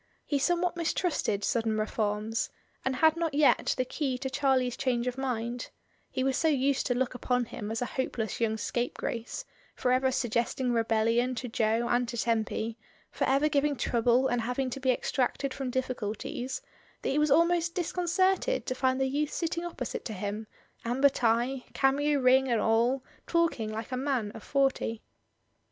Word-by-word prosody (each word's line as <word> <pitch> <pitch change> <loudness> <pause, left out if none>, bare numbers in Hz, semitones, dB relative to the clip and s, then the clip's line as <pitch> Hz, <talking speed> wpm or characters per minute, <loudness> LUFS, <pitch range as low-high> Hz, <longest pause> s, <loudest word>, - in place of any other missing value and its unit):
He 285 - 0
some 350 +5 +2
what 355 -1 0
mistrusted 330 - 0
sudden 225 -2 +1
reforms, 215 +1 -1 0.3
and 265 0 0
had 315 +4 +4
not 335 -3 -1
yet 295 -1 +4
the 255 - +1
key 260 0 -2
to 265 +1 -4
Charlie's 260 -3 +2
change 250 -3 0
of 250 -1 -1
mind; 245 -2 -3 0.4
he 260 - -2
was 265 0 +1
so 325 - +2
used 275 -2 +2
to 245 - +1
look 255 0 0
upon 250 0 0
him 210 -2 -6
as 225 +2 -1
a 245 - -6
hopeless 225 -4 -3
young 220 -1 +1
scape 240 +3 -2
grace, 240 - -4 0.3
for 250 - 0
ever 260 +1 +3
suggesting 240 +1 0
rebellion 230 +2 +2
to 245 +2 -4
Jo 225 0 +1
and 245 0 +1
to 235 - -5
Tempy, 225 0 -1 0.3
for - - -1
ever 275 +3 +3
giving 290 -1 +1
trouble 240 +1 +2
and 245 -2 0
having 250 +3 -1
to 270 - -4
be 265 -1 0
extracted 260 +2 0
from 270 -2 -3
difficulties, 255 +1 -3 0.4
that - - 0
he 285 - +2
was 300 0 +3
almost 335 +3 +3
dis 350 -3 -1
concerted 375 +7 +1
to - - -1
find 260 0 +1
the 265 - +2
youth 290 +3 0
sitting 335 0 -2
opposite 330 -8 -4
to 225 - -4
him, 210 +2 -4 0.4
amber 260 +4 +4
tie, 245 +1 +1
cameo 285 +2 +2
ring 260 +1 +5
and 235 -3 +2
all, 235 +5 +2 0.2
talking 330 -11 +1
like 220 +2 -5
a 255 - -1
man 255 -6 -1
of 220 - -10
forty. 270 -5 0
255 Hz, 180 wpm, -29 LUFS, 230-280 Hz, 0.4 s, ring